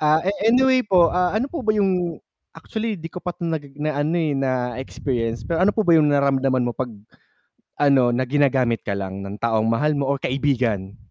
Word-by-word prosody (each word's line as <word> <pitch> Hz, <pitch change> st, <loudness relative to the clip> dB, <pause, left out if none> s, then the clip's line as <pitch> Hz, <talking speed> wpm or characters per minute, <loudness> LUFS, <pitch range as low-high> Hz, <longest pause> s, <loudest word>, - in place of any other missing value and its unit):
Ah, 155 Hz, +1 st, +3 dB
eh 180 Hz, -, -3 dB, 0.2 s
eh, 225 Hz, -, +4 dB
anyway 260 Hz, 0 st, +4 dB
po, 180 Hz, -4 st, +4 dB
ah, 180 Hz, 0 st, 0 dB
ano 235 Hz, +6 st, -1 dB
po 285 Hz, -7 st, -6 dB
ba 215 Hz, -, +3 dB
'yung 185 Hz, -5 st, 0 dB, 0.3 s
actually 215 Hz, +4 st, -5 dB
di 165 Hz, -, -6 dB
ko -, -, -18 dB
pa 180 Hz, 0 st, -4 dB
'to 170 Hz, -1 st, -5 dB
naggi 145 Hz, -4 st, -4 dB
na 155 Hz, -1 st, -1 dB
ano, 150 Hz, +3 st, 0 dB
eh, 150 Hz, -3 st, 0 dB
na-experience, 125 Hz, -2 st, -2 dB
pero 170 Hz, +2 st, +2 dB
ano 205 Hz, -, +3 dB
po 220 Hz, -, -1 dB
ba 165 Hz, -, +7 dB
'yung 150 Hz, -2 st, +4 dB
nararamdaman 135 Hz, -3 st, +1 dB
mo 120 Hz, -, -5 dB
'pag 125 Hz, -2 st, -3 dB, 0.9 s
ano, 140 Hz, -4 st, +4 dB
na 120 Hz, +2 st, 0 dB
ginagamit 130 Hz, -3 st, +1 dB
ka 100 Hz, -1 st, -3 dB
lang 95 Hz, 0 st, -5 dB
ng 100 Hz, +1 st, -7 dB
taong 110 Hz, 0 st, 0 dB
mahal 150 Hz, +7 st, +1 dB
mo 140 Hz, -2 st, -1 dB
o 140 Hz, -, +1 dB
kaibigan? 125 Hz, -8 st, -1 dB
145 Hz, 210 wpm, -22 LUFS, 125-175 Hz, 0.9 s, ba